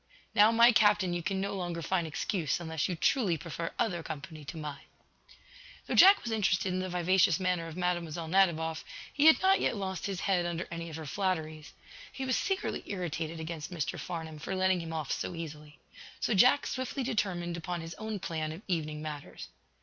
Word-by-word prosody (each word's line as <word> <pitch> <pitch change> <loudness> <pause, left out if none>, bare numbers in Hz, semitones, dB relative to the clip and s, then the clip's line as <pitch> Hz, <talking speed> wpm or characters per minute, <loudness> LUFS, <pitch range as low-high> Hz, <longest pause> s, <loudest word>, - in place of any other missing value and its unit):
"Now, 210 +2 +6
my 235 +1 +7
Captain, 205 -5 +4
you 175 - -2
can 190 +2 -2
no 200 +1 -2
longer 175 -3 -3
find 175 -2 0
excuse, 160 0 -1
unless 160 -2 -2
you 180 - -1
truly 190 - +2
prefer 165 0 -5
other 175 -6 0
company 155 0 -7
to 160 - -7
mine." 150 -2 -7 1.0
Though - - -3
Jack 390 +2 +8
was 235 - -3
interested 195 -3 +1
in 185 - -1
the 185 0 -3
vivacious 180 0 +3
manner 180 -3 0
of 165 +1 -8
Mlle. 175 -2 -2
Nadiboff, 160 -3 +2 0.3
he 295 +2 +4
had 320 - +8
not 385 +1 +5
yet - - +1
lost 190 -2 -3
his 195 -2 -4
head 185 -3 +2
under 170 0 -3
any 170 0 -5
of 155 - -7
her 160 -1 -6
flatteries. 155 -3 -2 0.4
He 265 - -5
was 260 - +1
secretly 385 0 -1
irritated 165 -4 -3
against 160 -1 -5
Mr. 170 -6 -3
Farnum 160 -3 -6
for 180 +5 -4
letting 185 -1 +2
him 165 -1 -6
off 155 -3 -3
so 180 - -2
easily. 150 -2 -8 0.4
So - - 0
Jack 250 +8 +5
swiftly 260 +1 -3
determined 185 -8 -1
upon 170 +1 -4
his 165 +1 -7
own 220 -1 -3
plan 160 -4 -3
of 165 +6 -9
evening 155 -4 -2
matters. 150 -2 -7
175 Hz, 195 wpm, -30 LUFS, 160-195 Hz, 1.0 s, Jack